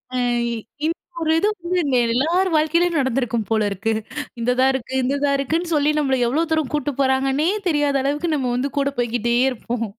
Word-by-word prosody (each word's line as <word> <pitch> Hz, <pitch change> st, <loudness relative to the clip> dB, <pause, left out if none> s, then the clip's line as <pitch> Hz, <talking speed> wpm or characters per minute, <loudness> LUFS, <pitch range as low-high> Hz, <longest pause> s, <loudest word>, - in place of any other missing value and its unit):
அ -, -, 0 dB, 0.7 s
இந்த 330 Hz, +2 st, 0 dB, 0.3 s
ஒரு 320 Hz, 0 st, +1 dB
இது 410 Hz, -, +2 dB, 0.2 s
வந்து 365 Hz, -, +2 dB, 0.3 s
எல்லார் 325 Hz, +11 st, +1 dB
வாழ்க்கையிலேயும் 335 Hz, +2 st, +2 dB
நடந்திருக்கும் 245 Hz, -4 st, 0 dB
போல 220 Hz, -1 st, +2 dB
இருக்கு. 210 Hz, +3 st, -1 dB, 0.5 s
இந்த 240 Hz, +2 st, +1 dB
தான் 265 Hz, +1 st, +5 dB
இருக்கு, 260 Hz, 0 st, -5 dB
இந்த 270 Hz, +3 st, 0 dB
தான் 280 Hz, -1 st, +2 dB
இருக்குன்னு 325 Hz, +5 st, -1 dB
சொல்லி 295 Hz, 0 st, +3 dB
நம்மள 270 Hz, -3 st, +1 dB
எவ்வளோ 305 Hz, +7 st, +1 dB
தூரம் 315 Hz, -4 st, 0 dB
கூட்டு 290 Hz, -1 st, 0 dB
போறாங்கன்னே 270 Hz, +3 st, +2 dB, 0.2 s
தெரியாத 290 Hz, -3 st, +1 dB
அளவுக்கு 295 Hz, +4 st, -1 dB
நம்ம 255 Hz, -3 st, -1 dB
வந்து 275 Hz, +2 st, -1 dB
கூட 280 Hz, 0 st, +1 dB
போய்க்கிட்டே 235 Hz, 0 st, 0 dB, 0.2 s
இருப்போம். 230 Hz, -1 st, -4 dB
275 Hz, 175 wpm, -21 LUFS, 245-310 Hz, 0.7 s, தான்